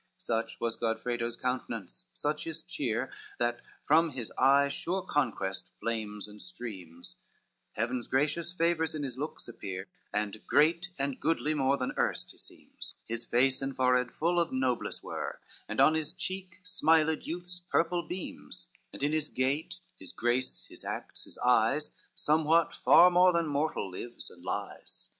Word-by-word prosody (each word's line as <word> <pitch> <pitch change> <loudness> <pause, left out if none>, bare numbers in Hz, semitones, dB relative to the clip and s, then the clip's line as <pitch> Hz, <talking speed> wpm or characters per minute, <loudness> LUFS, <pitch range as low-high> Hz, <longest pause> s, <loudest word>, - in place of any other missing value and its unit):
VII - - -43
Such 115 0 -2
was 115 -1 0
Godfredo's 115 +1 -1
countenance, 120 -6 -3
such 150 +1 -2
his 165 0 -4
cheer, 125 -1 -2 0.3
That 120 0 0 0.2
from 160 +2 +5
his 130 -6 -4
eye 140 +2 +5
sure 180 +6 -2
conquest 110 -9 -1
flames 105 -3 -3
and 105 0 -11
streams, 95 - -7 0.6
Heaven's 120 +2 -1
gracious 150 +5 +1
favors 165 -2 +1
in 150 - -2
his 130 -2 -4
looks 150 +2 -4
appear, 95 -4 -6 0.2
And 105 0 -1
great 170 +4 +4
and 140 -1 -1
goodly 155 -1 +1
more 140 -2 +2
than 125 - -2
erst - - 0
he - - -12
seems; - - -8
His 115 +1 -3
face 130 +3 +3
and 135 -1 -3
forehead 125 -1 +3
full 175 +2 +1
of 170 -1 +1
noblesse 130 -2 0
were, - - -4 0.3
And - - -3
on 155 - +7
his 160 -1 -1
cheek 185 -1 -4
smiled 160 -3 +3
youth's 180 +1 -4
purple 175 0 +1
beams, 180 +2 -6 0.2
And - - -5
in 145 - +3
his 155 -1 +1
gait, 135 +5 -1 0.2
his - - -7
grace, 120 +2 0
his - - -9
acts, - - -5
his - - -7
eyes, 125 +4 +3 0.2
Somewhat, 160 +2 +3
far 180 +1 +7
more 180 +1 +7
than 170 -1 +2
mortal, 145 -9 -1
lives 120 +6 -5
and 85 - -15
lies. 100 +2 -5
135 Hz, 160 wpm, -31 LUFS, 120-160 Hz, 0.6 s, on